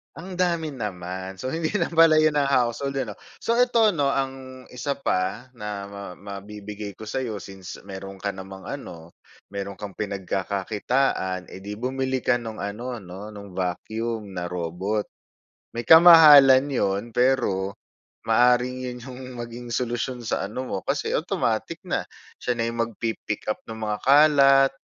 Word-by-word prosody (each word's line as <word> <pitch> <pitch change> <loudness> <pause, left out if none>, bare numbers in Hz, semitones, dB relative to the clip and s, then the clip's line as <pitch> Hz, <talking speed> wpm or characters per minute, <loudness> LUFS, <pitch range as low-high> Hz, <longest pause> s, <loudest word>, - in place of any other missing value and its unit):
Ang 180 +3 -8
dami 170 -5 0
naman, 95 -3 -5
so 130 - -4
hindi 160 +4 -1
lang 205 -4 -1
pala 160 -1 +7
'yun 155 -1 +3
ang 145 - +3
household 135 +2 +1
ano? 110 -6 -4 0.2
So 230 - 0
eto 235 -4 +4
'no, 140 -3 +2
ang 130 -1 -4
isa 125 +3 -4
pa 95 +2 -1
na 105 -2 -5
ma 100 0 -9 0.2
ma 100 +1 -9
mabibigay 105 0 -7
ko 110 - -8
sa'yo 115 -3 -3
since 95 -2 -9
meron 95 0 -8
ka 100 0 -3
namang 95 0 -9
ano 85 -12 -8 0.3
meron 100 0 -6
kang 100 -2 -7
pinagkakakitaan, 100 +1 -1
eh, 95 - -11
di 105 +1 -6
bumili 130 +1 -1
ka 125 - +2
nung 115 -3 -5
ano, 115 +4 -4
'no 95 +3 -9
nung 100 -3 -11
vacuum 105 +3 -3
na 90 -1 -4
robot. 90 +5 -2 0.7
May 120 - -3
kamahalan 150 -5 +9
'yun 100 -6 0
pero 120 -7 +1 0.5
maaaring 125 +2 +4
'yun 125 - -8
'yung 130 -1 -8 0.2
maging 120 0 -7
solusyon 120 +1 -2
sa - - 0
ano 130 +5 -5
mo - - -2
kasi - - -1
automatic - - -1
na, - - 0 0.4
siya 125 - -1
na 115 - +1
'yung 115 0 0
magpi-pick 115 -2 -4
up - - -7
ng 110 0 -7
mga 105 -1 -2
kalat, 140 -1 +6
115 Hz, 155 wpm, -25 LUFS, 100-135 Hz, 0.7 s, kamahalan